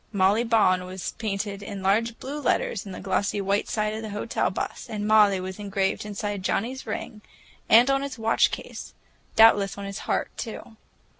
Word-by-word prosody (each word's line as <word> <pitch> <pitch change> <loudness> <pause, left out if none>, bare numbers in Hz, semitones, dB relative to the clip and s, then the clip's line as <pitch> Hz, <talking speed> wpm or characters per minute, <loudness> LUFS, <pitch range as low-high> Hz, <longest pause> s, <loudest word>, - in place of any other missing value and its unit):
"Molly 200 +2 +3
Bawn" 205 -6 +3
was 185 0 -5
painted 200 -2 -3
in 200 -1 -7
large 225 +4 +1
blue 285 +3 -6
letters 215 -6 0
on - - -7
the - - -7
glossy 200 +1 -1
white 200 +1 0
side 215 -1 -1
of 220 - -4
the 220 - -6
hotel 210 +2 -1
bus, - - -5
and 210 -2 -3
"Molly" 210 -3 +5
was 185 +2 -6
engraved 200 0 -1
inside 205 -1 -4
Johnnie's 240 +8 -2
ring 215 - -5 0.5
and 235 +3 +7
on 275 0 +2
his 280 -2 -5
watch 225 0 +3
case—doubtless 205 -4 +1
on 200 - -6
his 200 +1 -5
heart, - - -2
too. 225 -1 -7
205 Hz, 175 wpm, -25 LUFS, 195-225 Hz, 0.5 s, and